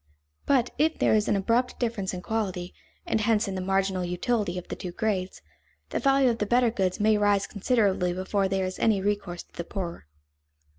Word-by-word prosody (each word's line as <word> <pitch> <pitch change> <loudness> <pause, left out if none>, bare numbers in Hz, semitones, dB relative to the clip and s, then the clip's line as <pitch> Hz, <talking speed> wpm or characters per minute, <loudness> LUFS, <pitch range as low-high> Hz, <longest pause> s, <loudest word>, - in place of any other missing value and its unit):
But 255 -3 +3
if 315 +2 +2
there - - +3
is 210 -1 +2
an - - +2
abrupt 230 +6 0
difference 225 -6 -1
in 180 -1 -6
quality, 190 -5 -3 0.3
and 220 - 0
hence 215 -1 +2
in 195 - -3
the 185 - -3
marginal 195 0 0
utility 180 +1 -1
of 180 - -6
the - - -5
two 180 - -6
grades, 190 -2 -2 0.5
the - - 0
value 270 -2 +4
of 230 - -4
the 210 - -1
better 240 +1 +3
goods 190 -5 -1
may 215 0 +3
rise 205 -1 +3
considerably 200 -4 +1
before 190 +2 0
there 190 0 0
is 185 0 -5
any 215 -3 +3
recourse 200 -3 -2
to - - -36
the 170 - -5
poorer. 170 - -6
200 Hz, 200 wpm, -27 LUFS, 185-225 Hz, 0.5 s, value